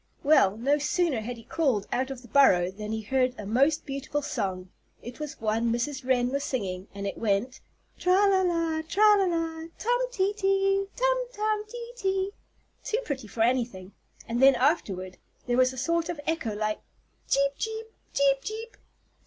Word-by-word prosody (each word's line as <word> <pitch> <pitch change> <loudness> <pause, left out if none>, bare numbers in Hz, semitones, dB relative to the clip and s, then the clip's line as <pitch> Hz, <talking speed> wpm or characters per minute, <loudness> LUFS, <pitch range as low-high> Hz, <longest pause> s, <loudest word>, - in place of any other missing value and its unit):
Well, 215 -9 +4
no 280 +6 +2
sooner 295 -4 +1
had 240 +2 -5
he 230 - -12
crawled 250 -6 0
out 260 +2 0
of 260 -2 -7
the - - -13
burrow 185 -8 +4
than 210 +2 -6
he 220 0 -2
heard 255 +2 +1
a 210 - -7
most 275 +9 +2
beautiful 275 +1 -3
song. 185 -7 -3 0.3
It 240 +3 -9
was 300 -2 -6
one 225 +1 0
Mrs. 260 +4 -2
Wren 250 -1 +2
was 280 +1 -1
singing, 190 -9 -3
and 200 0 -5
it 200 - -4
went 225 +4 0 0.4
"tra 365 - +3
la 385 -1 +4
la 335 -3 0
tra 340 +6 0 0.2
la 390 - +3
la! 330 -2 -2
tum 485 +2 +1
tee 400 -4 +1
tee 390 -1 +1
tum - - +2 0.2
tum 425 -1 -1
tee 475 0 -7
tee!" 385 -4 -1 0.5
too 440 - -1
pretty 265 -6 -4
for 225 - -5
anything. 230 -6 -1 0.4
And 235 +2 -1
then, 270 0 +7
afterward, 195 - 0 0.3
there 245 -1 0
was 255 0 +4
a 260 - -10
sort 335 +5 0
of 345 - -3
an 290 - -10
echo 280 -10 -1
like 215 0 -2 0.5
"cheep 275 0 +3
cheep 445 0 -3 0.3
cheep 275 -1 +2
cheep!" 445 - -6
275 Hz, 185 wpm, -27 LUFS, 230-345 Hz, 0.5 s, then